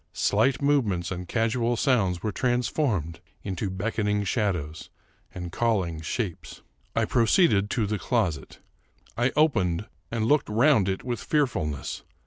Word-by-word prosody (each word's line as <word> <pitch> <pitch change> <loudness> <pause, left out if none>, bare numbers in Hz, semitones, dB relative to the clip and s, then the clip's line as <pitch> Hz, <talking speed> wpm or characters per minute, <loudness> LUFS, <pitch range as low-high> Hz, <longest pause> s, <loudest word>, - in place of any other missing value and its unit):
Slight 115 +9 +1
movements 105 -12 +1
and 90 -1 -5
casual 115 +3 0
sounds 100 - +1
were 105 - -1
transformed 120 - -1 0.2
into 95 0 -3
beckoning 105 +1 -1
shadows 90 - -2 0.4
and 90 -1 -7
calling 95 -9 0
shapes. 90 +2 -4 0.3
I - - +2
proceeded 115 - +3
to 115 -2 0
the 105 0 -2
closet. 90 - -1 0.6
I 120 +3 +1
opened 105 - +2 0.2
and 115 -1 -1
looked 145 +1 +2
round 110 -2 +4
it 95 - -3
with 120 -3 -3
fearfulness. 80 - -1
105 Hz, 125 wpm, -26 LUFS, 90-120 Hz, 0.6 s, round